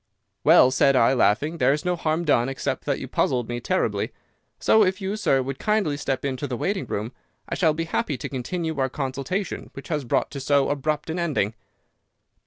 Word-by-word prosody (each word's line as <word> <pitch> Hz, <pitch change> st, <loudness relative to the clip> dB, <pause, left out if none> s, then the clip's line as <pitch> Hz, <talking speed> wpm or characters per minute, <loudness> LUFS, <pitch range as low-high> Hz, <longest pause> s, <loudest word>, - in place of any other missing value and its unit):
"'Well,' 155 Hz, -5 st, +7 dB
said 135 Hz, +1 st, +4 dB
I, 125 Hz, +1 st, +4 dB
laughing, 135 Hz, +8 st, +2 dB
'there 130 Hz, +1 st, +4 dB
is 150 Hz, -, -3 dB
no 180 Hz, 0 st, +1 dB
harm 165 Hz, 0 st, -1 dB
done 130 Hz, -4 st, +3 dB
except 135 Hz, -, -3 dB
that -, -, 0 dB
you -, -, -6 dB
puzzled 125 Hz, -3 st, 0 dB
me 120 Hz, 0 st, -3 dB
terribly; -, -, -1 dB, 0.5 s
so 220 Hz, -, +5 dB
if 190 Hz, 0 st, 0 dB
you, 195 Hz, +1 st, -2 dB
sir, 135 Hz, -11 st, +2 dB
would 135 Hz, +1 st, -5 dB
kindly 210 Hz, -9 st, +1 dB
step 140 Hz, -2 st, -2 dB
into 135 Hz, +1 st, -2 dB
the 125 Hz, -3 st, -3 dB
waiting 195 Hz, -, -2 dB
room 110 Hz, +4 st, -3 dB, 0.4 s
I -, -, -4 dB
shall 160 Hz, -4 st, +2 dB
be 165 Hz, -, -1 dB
happy 160 Hz, -3 st, -2 dB
to -, -, -5 dB
continue 160 Hz, +4 st, -3 dB
our 130 Hz, 0 st, +1 dB
consultation 140 Hz, +8 st, -3 dB
which 135 Hz, -, -9 dB
was 150 Hz, -2 st, 0 dB
brought 120 Hz, -, 0 dB
to 140 Hz, -, -5 dB
so 140 Hz, 0 st, +2 dB
abrupt 150 Hz, +2 st, -2 dB
an 170 Hz, -, -3 dB
ending. 145 Hz, -11 st, 0 dB
145 Hz, 200 wpm, -24 LUFS, 130-165 Hz, 0.5 s, Well